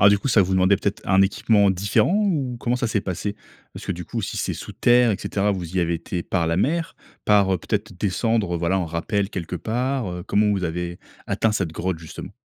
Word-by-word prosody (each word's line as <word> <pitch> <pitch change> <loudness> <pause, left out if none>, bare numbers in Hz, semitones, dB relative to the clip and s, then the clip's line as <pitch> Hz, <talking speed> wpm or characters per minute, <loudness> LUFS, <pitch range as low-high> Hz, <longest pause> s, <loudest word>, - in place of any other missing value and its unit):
Alors 100 - +8
du 100 - +4
coup, 135 - -3
ça 115 -5 +5
vous 95 +1 -2
demandait 95 +2 +4
peut-être 100 +1 -2
un 95 0 +4
équipement 100 +1 +3
différent, 100 - +2
ou 155 - 0
comment 120 +1 0
ça 125 - -1
s'est 110 -2 0
passé? 100 +2 -4 0.4
Parce - - -9
que - - 0
du 90 0 -7
coup, 115 +6 -4
si 95 - -4
c'est - - -1
sous - - -8
terre, 120 -1 +4
et 100 - +1
cetera 100 +1 0
vous 90 -2 -5
y 90 - +3
avez 85 0 +1
été 85 +1 -4
par 85 -2 -1
la 85 +1 0
mer, 165 - 0 0.3
par, 100 -2 +4
heu 95 - +1
peut-être 105 +5 -3
descendre, 100 -1 0
voilà, 85 +3 +1
en 90 - -1
rappel 90 +5 -1
quelque 90 -1 -4
part, 125 +1 -1
heu, 90 0 -5
comment 105 0 +2
vous 95 -3 -1
avez 85 +1 -3 0.3
atteint 110 - +1
cette 95 -6 -1
grotte 90 +1 -2
justement? 80 -1 -9
100 Hz, 235 wpm, -23 LUFS, 90-110 Hz, 0.4 s, Alors